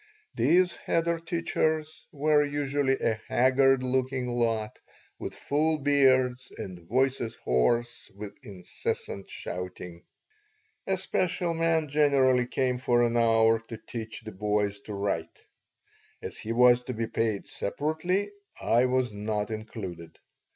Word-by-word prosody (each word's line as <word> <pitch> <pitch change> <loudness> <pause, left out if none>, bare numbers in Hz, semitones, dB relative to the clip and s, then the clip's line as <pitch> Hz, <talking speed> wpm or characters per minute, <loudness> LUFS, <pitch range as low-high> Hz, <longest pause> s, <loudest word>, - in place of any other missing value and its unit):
These 180 0 +3
cheder 170 0 +1
teachers 160 -2 -1
were 150 0 +3
usually 145 -2 0
a 110 -1 0
haggard 130 +1 +3
looking 130 0 0
lot 115 -3 -1 0.4
with - - -6
full 155 +2 +1
beards 130 -3 +3
and 90 -2 -7
voices 120 +4 0
hoarse 115 - 0
with 100 0 -7
incessant 95 0 -5
shouting. 90 -1 -6 0.9
A 190 -1 +1
special 180 -2 0
man 165 -1 +1
generally 135 -4 +3
came 125 -1 0
for 120 -1 +3
an 120 0 +1
hour 115 -1 +4
to 115 - -7
teach 110 +1 -7
the 110 -1 -8
boys 105 0 -1
to 105 - -5
write. 100 -5 -3 0.7
As - - -7
he 110 - -5
was 125 +1 +5
to 125 - -4
be 115 +1 -1
paid 110 -2 -1
separately, 165 - -2 0.3
I 120 +2 +3
was 125 -3 0
not 105 +1 -2
included. 95 -7 -7
125 Hz, 125 wpm, -28 LUFS, 110-145 Hz, 0.9 s, was